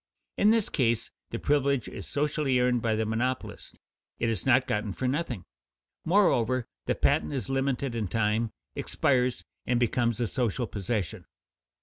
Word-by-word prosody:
In 205 - +4
this 225 -2 +3
case 120 -5 0 0.2
the - - -3
privilege 140 -4 +1
is 95 - -8
socially 145 -2 +1
earned 125 -1 +2
by 110 -1 +1
the 110 0 0
monopolist; 120 +4 -3 0.4
it 115 - 0
is 115 +2 -2
not 130 0 +5
gotten 105 -2 -1
for 130 - -2
nothing. 130 - -2 0.6
Moreover, 130 - +3 0.2
the - - +2
patent 75 - +2
is 130 -4 -3
limited 135 -1 0
in 110 -3 -1
time, 110 +2 +1 0.3
expires 125 -2 +1 0.2
and 125 -1 +2
becomes 120 -1 +1
a 120 - +1
social 120 0 -1
possession. 105 -3 -3
125 Hz, 150 wpm, -28 LUFS, 110-135 Hz, 0.6 s, not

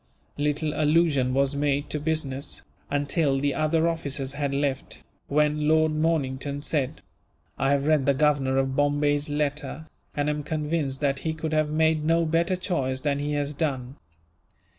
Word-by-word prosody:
Little 150 +1 0
allusion 150 -4 +2
was 140 +1 +2
made 145 0 0
to 150 - -1
business, 145 -3 -2 0.3
until 145 -1 +1
the 140 0 0
other 160 +2 +2
officers 140 -5 -2
had 140 -1 -2
left, 140 -1 -2 0.3
when 150 +1 +1
Lord 155 0 +4
Mornington 145 -3 -1
said: 140 -3 -1 0.6
"I 135 - +2
have 140 0 +2
read 150 -3 +2
the 140 - +4
Governor 135 -2 +2
of 135 0 0
Bombay's 145 +1 +1
letter, 150 +1 -2 0.3
and 145 0 0
am 150 0 -1
convinced 150 -2 -2
that 140 -1 +1
he 160 +1 -2
could 160 0 -3
have 155 -1 +2
made 160 0 +2
no 165 +1 +2
better 170 +3 +1
choice 135 -8 -2
than 145 -1 0
he 145 +1 -2
has 145 0 -1
done. 135 -4 -2
145 Hz, 160 wpm, -26 LUFS, 140-155 Hz, 0.6 s, Lord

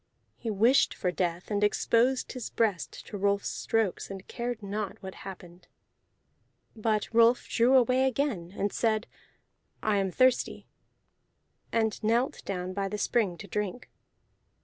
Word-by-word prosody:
He 230 - -5
wished 225 +6 +4
for 180 - -1
death, 180 +1 -2
and 205 0 +1
exposed 235 +5 +2
his 255 -3 -5
breast 210 -7 -1
to 205 - -7
Rolf's 200 0 +1
strokes, 225 -5 -1
and 195 -1 -8
cared 240 -2 -4
not 200 0 -3
what 190 0 -6
happened. 180 -2 -11 1.1
But 215 -1 0
Rolf 230 +1 +5
drew 245 +3 +3
away 255 +1 +4
again, 245 -10 -1
and 200 0 -1
said, 220 -1 +1 0.8
"I 215 -1 +2
am 195 -1 +1
thirsty," 255 +6 +2 1.1
and 220 -1 0
knelt 235 +4 +1
down 185 -1 -3
by 195 0 -1
the 210 +2 -4
spring 205 -4 +1
to 200 - -9
drink. 210 +4 -4
215 Hz, 140 wpm, -29 LUFS, 195-235 Hz, 1.1 s, Rolf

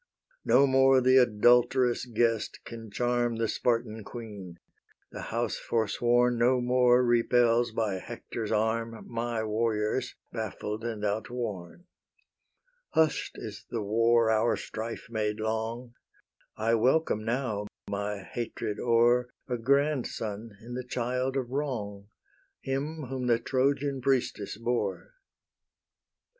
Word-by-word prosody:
No 140 - +5
more 135 0 +5
the 130 +1 +5
adulterous 125 +1 +4
guest 115 -1 0
can 115 -2 -8
charm 120 +2 0
The 115 0 0
Spartan 115 -2 -1
queen: 100 -7 -9 0.5
the - - -7
house 115 +1 -1
forsworn 120 +2 +1
No 125 +2 +4
more 125 0 +4
repels 120 0 +3
by 110 -4 -1
Hector's 110 +3 -6
arm 115 +1 -1
My 115 -1 -2
warriors, 110 +3 -1 0.2
baffled 110 -1 -4
and 110 -3 -3
outworn: 105 - -4 1.1
Hush'd 160 -2 +2
is - - -8
the 115 -3 -3
war 115 +2 +3
our 110 +1 +2
strife 115 +1 -6
made 105 -2 -2
long: 110 +2 -3 0.6
I 110 +1 +1
welcome 125 -1 +2
now, 115 -3 -2 0.2
my 100 0 -3
hatred 110 -1 -4
o'er, 120 +1 +3 0.2
A 125 -2 -2
grandson 115 -5 -1
in 120 +2 -9
the 125 +1 -4
child 125 +2 -2
of 125 -2 -3
wrong, 110 -8 -3 0.5
Him 145 +4 -3
whom 130 -1 -4
the 120 -1 +4
Trojan 135 +2 0
priestess 120 -6 0
bore. 120 - -2
120 Hz, 115 wpm, -29 LUFS, 110-125 Hz, 1.1 s, No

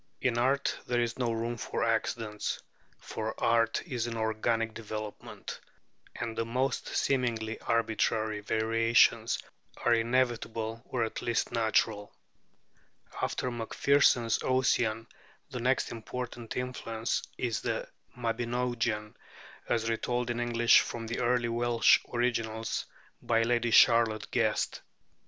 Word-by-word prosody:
In 120 -2 +1
art 135 +3 +1
there 120 -1 +1
is 120 +1 -1
no 120 -2 +1
room 115 +1 -2
for - - -2
accidents: 115 -2 -1 0.4
for 110 0 -5
art 115 -1 +2
is 125 -8 -2
an 115 -1 -4
organic 110 +1 0
development, 110 -1 -7 0.6
and 115 -2 -4
the 115 - 0
most 125 +3 -1
seemingly 115 -5 0
arbitrary 110 -2 0
variations 115 +2 +3 0.4
are 120 - +2
inevitable 115 -1 0
or 120 -2 -1
at 110 - -3
least 115 -2 0
natural. 110 -2 +1 1.1
After 125 - -1
Macpherson's 120 0 +3
'Ossian' 120 -3 +1 0.5
the 125 - -4
next 130 +2 +1
important 120 0 -6
influence 120 -3 -2 0.2
is 120 -3 -1
the - - -2 0.3
'Mabinogion,' 120 -2 -1 0.6
as 115 -2 +1
retold 120 +1 -1
in 120 - -3
English 120 -1 +5
from 115 -1 -4
the 115 +2 -3
early 120 -1 +2
Welsh 120 0 +4
originals 115 -2 -1 0.3
by 115 -1 +2
Lady 120 0 +1
Charlotte 115 -1 +5
Guest. 110 -3 0
115 Hz, 115 wpm, -30 LUFS, 110-120 Hz, 1.1 s, English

